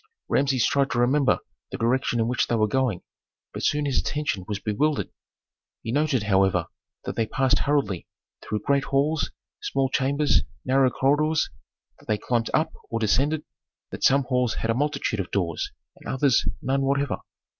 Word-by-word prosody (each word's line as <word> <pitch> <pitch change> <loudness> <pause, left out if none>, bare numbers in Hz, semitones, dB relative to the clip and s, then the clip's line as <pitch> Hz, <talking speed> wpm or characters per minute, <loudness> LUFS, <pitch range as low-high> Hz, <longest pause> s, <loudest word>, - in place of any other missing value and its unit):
Rameses 135 -3 +2
tried 140 -1 +2
to 120 - -1
remember 135 +3 +3 0.3
the - - -4
direction 120 0 +1
in 115 - +2
which 125 +1 +1
they 120 - +1
were 110 -1 +2
going, 125 -5 0 0.5
but - - -5
soon 150 0 +1
his 135 -3 +1
attention 145 -11 -2
was 105 -2 -2
bewildered. 135 +9 0 0.7
He 115 - -3
noted, 145 -4 +1
however, 95 -4 +2 0.4
that - - -4
they 115 - 0
passed 135 +3 +2
hurriedly 140 - 0 0.3
through 105 -1 -3
great 140 -1 +2
halls, 145 +3 +1 0.3
small 135 -1 0
chambers, 140 +3 +2 0.2
narrow 130 0 +4
corridors, 150 +5 +1 0.5
that - - -20
they 110 - +1
climbed 115 +1 -1
up 155 - +1 0.2
or 115 - -2
descended, 135 +8 +1 0.5
that - - -7
some 140 +1 +5
halls 125 -2 0
had 115 - -1
a - - +2
multitude 140 -4 -1
of 90 - -3
doors 85 -5 -2 0.3
and - - -12
others 130 -2 +2 0.2
none 135 +1 +1
whatever. 140 0 0
130 Hz, 165 wpm, -25 LUFS, 115-140 Hz, 0.7 s, some